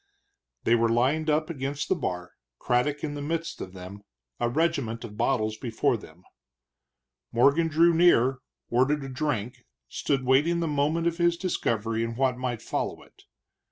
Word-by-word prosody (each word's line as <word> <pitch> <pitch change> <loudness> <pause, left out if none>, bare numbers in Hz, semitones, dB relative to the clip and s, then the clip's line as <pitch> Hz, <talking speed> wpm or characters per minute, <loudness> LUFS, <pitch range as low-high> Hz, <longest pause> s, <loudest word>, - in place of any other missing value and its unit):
They 115 - +3
were 115 -1 +3
lined 135 +7 +1
up 155 +2 +1
against 140 -1 -3
the - - +3
bar, 90 - -4 0.3
Craddock 140 +4 0
in 150 -2 -2
the 145 - -5
midst 165 +3 -3
of 90 - -7
them, 95 +2 -9 0.4
a 120 - +1
regiment 135 -6 0
of 105 -3 -8
bottles 110 -3 0
before 125 +3 0
them. 90 -5 -12 1.1
Morgan 140 +8 +4
drew 165 +2 +4
near, 135 -7 +4 0.3
ordered 135 +4 +2
a 135 - -6
drink, 125 -4 -3 0.3
stood 135 -3 -1
waiting 145 +7 +3
the 170 - -1
moment 150 +3 0
of 170 0 0
his 170 0 +3
discovery 115 - -1
and 115 0 -4
what 130 -1 +2
might 125 -2 -4
follow - - -3
it. - - -22
135 Hz, 160 wpm, -27 LUFS, 115-155 Hz, 1.1 s, Morgan